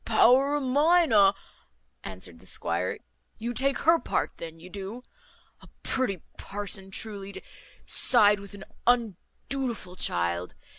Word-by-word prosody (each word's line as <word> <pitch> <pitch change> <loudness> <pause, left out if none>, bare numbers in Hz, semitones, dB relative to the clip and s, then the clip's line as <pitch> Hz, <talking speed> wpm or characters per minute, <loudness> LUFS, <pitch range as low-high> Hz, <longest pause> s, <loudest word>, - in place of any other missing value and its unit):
"Power 255 +5 +4
of 295 - -1
mine 305 +5 +4
a 200 -2 +6 0.3
," 65 +1 -45
answered 90 -3 -8
the - - -11
squire. - - -1 0.4
"You 235 +2 -4
take 275 +3 +1
her 330 +2 +5
part - - -1
then, 165 -1 -8
you 170 - -11
do? 200 +6 -7 0.6
A - - -15 0.2
pretty 200 -10 -1 0.2
parson, 195 -1 -4
truly, 200 -1 -6
to - - -8 0.4
side 210 -4 +4
with 200 0 -10
an 195 - -10 0.2
undutiful 235 -1 -1
child! 85 - -2
205 Hz, 140 wpm, -27 LUFS, 185-255 Hz, 0.6 s, a